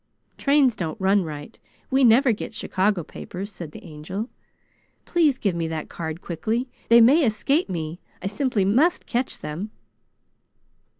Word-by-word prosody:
"Trains 275 Hz, -4 st, +3 dB
don't 170 Hz, +2 st, -4 dB
run 195 Hz, +1 st, +3 dB
right. 150 Hz, -3 st, -8 dB, 0.3 s
We 265 Hz, +1 st, +4 dB
never 245 Hz, +2 st, +6 dB
get 215 Hz, -, -5 dB
Chicago 190 Hz, -1 st, 0 dB
papers," 190 Hz, +5 st, -7 dB
said 170 Hz, -5 st, -8 dB
the -, -, -11 dB
Angel. 185 Hz, +9 st, -6 dB, 0.7 s
"Please 310 Hz, -7 st, +2 dB
give 200 Hz, -7 st, 0 dB
me 165 Hz, -1 st, -2 dB
that 160 Hz, -1 st, -4 dB
card 160 Hz, 0 st, -5 dB
quickly. 220 Hz, +9 st, -2 dB, 0.2 s
They 235 Hz, 0 st, +8 dB
may 280 Hz, +8 st, +6 dB
escape 270 Hz, -, +1 dB
me. 165 Hz, -1 st, -4 dB, 0.2 s
I -, -, -9 dB
simply 205 Hz, 0 st, 0 dB
must 270 Hz, -, +2 dB
catch 250 Hz, +2 st, -1 dB
them!" 170 Hz, +8 st, -5 dB
205 Hz, 145 wpm, -24 LUFS, 170-250 Hz, 0.7 s, They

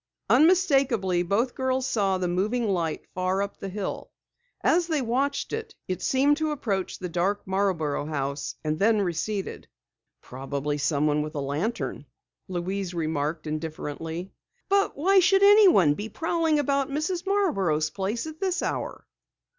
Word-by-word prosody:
Unmistakably, 275 Hz, -, +4 dB
both 205 Hz, +8 st, 0 dB
girls 260 Hz, 0 st, -1 dB
saw 195 Hz, -6 st, +1 dB
the 185 Hz, -1 st, -1 dB
moving 215 Hz, +7 st, 0 dB
light 170 Hz, -5 st, -1 dB
far 185 Hz, +2 st, 0 dB
up 200 Hz, -, -7 dB
the 195 Hz, -, -5 dB
hill. 195 Hz, 0 st, -5 dB, 0.5 s
As 345 Hz, 0 st, +3 dB
they 315 Hz, -3 st, 0 dB
watched, 265 Hz, +3 st, -1 dB
it 440 Hz, -, -5 dB
seemed 280 Hz, +3 st, +3 dB
to 315 Hz, -1 st, 0 dB
approach 215 Hz, -11 st, -2 dB
the 185 Hz, -, -5 dB
dark 180 Hz, +4 st, -1 dB
Marborough 185 Hz, -7 st, 0 dB
house, 140 Hz, -2 st, -3 dB
and 155 Hz, 0 st, -1 dB
then 215 Hz, +1 st, +3 dB
receded. 190 Hz, +3 st, -3 dB, 0.5 s
"Probably 140 Hz, +3 st, -4 dB
someone 150 Hz, +1 st, +1 dB
with 150 Hz, 0 st, -5 dB
a -, -, -1 dB
lantern," 150 Hz, +12 st, -3 dB, 0.4 s
Louise 185 Hz, 0 st, -3 dB
remarked 155 Hz, -1 st, -2 dB
indifferently. 160 Hz, +3 st, -5 dB, 0.4 s
"But 395 Hz, -4 st, +2 dB
why 380 Hz, +6 st, +4 dB
should 385 Hz, +2 st, +4 dB
anyone 395 Hz, -, +7 dB
be 205 Hz, +8 st, -6 dB
prowling 325 Hz, +3 st, 0 dB
about 280 Hz, -1 st, +1 dB
Mrs. 330 Hz, +6 st, -2 dB
Marborough's 195 Hz, -, +1 dB
place 205 Hz, +6 st, -2 dB
at 315 Hz, 0 st, -8 dB
this 380 Hz, -1 st, -1 dB
hour?" -, -, -3 dB
195 Hz, 140 wpm, -26 LUFS, -, 0.5 s, anyone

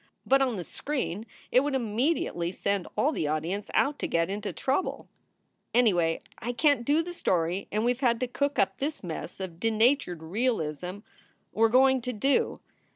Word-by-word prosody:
But 270 Hz, 0 st, +4 dB
on 255 Hz, -4 st, +1 dB
the 180 Hz, -, -4 dB
screen 230 Hz, -, -4 dB, 0.2 s
it 250 Hz, -, +6 dB
would 280 Hz, +1 st, 0 dB
immediately 230 Hz, -, 0 dB
send 200 Hz, 0 st, -1 dB
all 295 Hz, -, +3 dB
the 155 Hz, -, -1 dB
audience 165 Hz, +7 st, -2 dB
out 285 Hz, +1 st, +2 dB
to -, -, -1 dB
get 165 Hz, +2 st, +1 dB
into 205 Hz, +1 st, -3 dB
trouble. 275 Hz, +7 st, -1 dB, 0.7 s
Anyway, 175 Hz, -9 st, +3 dB, 0.2 s
I 245 Hz, +2 st, -3 dB
can 285 Hz, +3 st, +4 dB
t -, -, -7 dB
do 300 Hz, +5 st, +3 dB
the 350 Hz, +1 st, -6 dB
story 180 Hz, -, 0 dB
and 215 Hz, +2 st, 0 dB
we 245 Hz, -, +4 dB
ve 255 Hz, +3 st, -11 dB
had 235 Hz, -1 st, +1 dB
to 255 Hz, -, +1 dB
cook 280 Hz, +4 st, -1 dB
up -, -, +1 dB
this 290 Hz, -1 st, -3 dB
mess 170 Hz, +1 st, -6 dB
of 180 Hz, -3 st, -6 dB
denaturated 225 Hz, -, +2 dB
realism 180 Hz, -, -1 dB, 0.5 s
we 220 Hz, -, -4 dB
re -, -, +4 dB
going 260 Hz, +2 st, +5 dB
to 250 Hz, +1 st, -3 dB
do. 270 Hz, +6 st, +1 dB
230 Hz, 185 wpm, -28 LUFS, 180-270 Hz, 0.7 s, it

